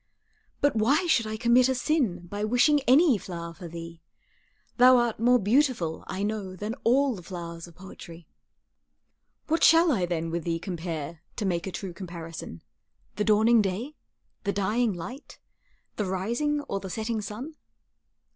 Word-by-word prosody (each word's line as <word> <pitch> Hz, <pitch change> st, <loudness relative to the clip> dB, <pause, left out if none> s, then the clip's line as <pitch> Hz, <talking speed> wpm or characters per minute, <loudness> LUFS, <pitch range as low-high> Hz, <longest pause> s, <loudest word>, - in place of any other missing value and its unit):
But 285 Hz, -2 st, +2 dB
why 250 Hz, +11 st, +2 dB
should 245 Hz, -10 st, +2 dB
I 215 Hz, 0 st, -4 dB
commit 240 Hz, +2 st, +4 dB
a 260 Hz, -, +1 dB
sin 245 Hz, -, 0 dB
By 205 Hz, +4 st, -5 dB
wishing 245 Hz, +7 st, +4 dB
any 270 Hz, -, +5 dB
flower 170 Hz, -2 st, -7 dB
for 175 Hz, 0 st, -9 dB
thee; 165 Hz, 0 st, -9 dB, 0.8 s
Thou 255 Hz, +1 st, +7 dB
art 240 Hz, -3 st, 0 dB
more 245 Hz, +2 st, +5 dB
beautiful, 225 Hz, -, +1 dB
I 190 Hz, +2 st, -3 dB
know, 205 Hz, -3 st, -3 dB
Than 210 Hz, +4 st, -4 dB
all 265 Hz, +3 st, +3 dB
the 190 Hz, -, -8 dB
flowers 170 Hz, -1 st, -7 dB
of 170 Hz, -, -16 dB
poetry. 170 Hz, -3 st, -12 dB, 1.2 s
What 325 Hz, +2 st, 0 dB
shall 330 Hz, 0 st, +6 dB
I 190 Hz, -9 st, +1 dB
then 165 Hz, -1 st, -2 dB
with 170 Hz, 0 st, -2 dB
thee 165 Hz, 0 st, -1 dB
compare, 165 Hz, -3 st, -5 dB
To 215 Hz, -, -3 dB
make 175 Hz, -1 st, -1 dB
a -, -, -4 dB
true 185 Hz, -1 st, -6 dB
comparison 165 Hz, -, -8 dB, 0.5 s
The 210 Hz, -, +1 dB
dawning 220 Hz, +2 st, +5 dB
day, 210 Hz, +9 st, -3 dB, 0.5 s
the 200 Hz, -, 0 dB
dying 215 Hz, +4 st, +1 dB
light, 200 Hz, -, -8 dB, 0.6 s
The 210 Hz, -, -1 dB
rising 235 Hz, +11 st, -1 dB
or 200 Hz, -8 st, -4 dB
the 195 Hz, -, -7 dB
setting 220 Hz, +2 st, -2 dB
sun? 220 Hz, +10 st, -7 dB
210 Hz, 160 wpm, -27 LUFS, 175-245 Hz, 1.2 s, Thou